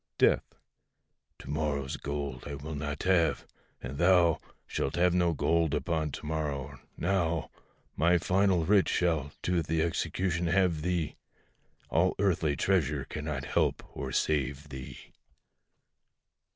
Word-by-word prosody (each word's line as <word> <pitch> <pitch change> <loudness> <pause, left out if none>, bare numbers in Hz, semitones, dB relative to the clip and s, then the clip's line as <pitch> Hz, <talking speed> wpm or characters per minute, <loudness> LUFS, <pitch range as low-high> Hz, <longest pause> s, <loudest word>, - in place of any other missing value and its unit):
DEATH. - - +2 0.8
To - - -11
morrow's 70 -3 -1
gold 70 -3 -4
I 70 - -4
will 75 +3 -6
not 75 0 -4
have; 85 -5 +2 0.4
and 70 +4 -6
thou 85 -2 +5 0.3
Shalt 70 - -2
have 90 0 +3
no 90 -2 +3
gold 80 0 +1
upon 80 0 -1
to - - -7
morrow: 70 -3 -3 0.2
now 85 -3 0 0.4
My 85 +4 +4
final 90 -1 +2
writ 100 +1 +4
shall 80 -5 +1
to 90 -2 +1
th' 75 - -9
execution 85 +2 0
have 90 -3 +2
thee, 85 -2 -1 0.7
All 95 +3 +3
earthly 85 -7 +1
treasure 75 -5 +1
cannot 75 -3 -4
help - - -1
or - - -4
save 70 0 0
thee. 65 -2 -8
80 Hz, 125 wpm, -30 LUFS, 75-90 Hz, 0.8 s, thou